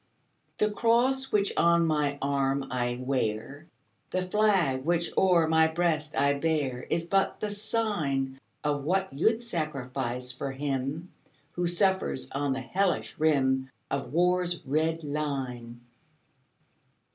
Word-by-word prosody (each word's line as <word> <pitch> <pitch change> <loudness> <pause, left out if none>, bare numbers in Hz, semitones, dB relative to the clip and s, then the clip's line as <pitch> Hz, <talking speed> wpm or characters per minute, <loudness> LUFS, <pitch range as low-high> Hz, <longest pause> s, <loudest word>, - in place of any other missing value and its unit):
The 210 0 +2
cross 245 +5 +2
which 200 -1 +2
on 170 0 +4
my 150 -3 +1
arm 140 -1 +1
I 120 -1 -1
wear, 130 +3 -2 0.4
The 185 0 -1
flag 185 -9 +2
which 170 +2 +1
o'er 175 -4 +4
my 160 0 +4
breast 160 -2 -1
I 140 +1 +4
bear, 140 -4 -1
Is 165 0 0
but 195 +3 +1
the 210 - -2
sign 200 -12 -1 0.2
Of 145 -1 0
what 190 +3 0
you 160 +11 +3
'd 240 - -13
sacrifice 130 - -3
for 135 +2 -4
him 140 +4 -3 0.4
Who 175 +1 -1
suffers 190 -5 0
on 140 0 0
the 130 - -3
hellish 185 +8 -1
rim 130 -4 +2 0.2
Of 140 - -2
war's 175 +1 +1
red 160 +3 0
line. 135 -5 -4
155 Hz, 130 wpm, -28 LUFS, 135-180 Hz, 0.4 s, on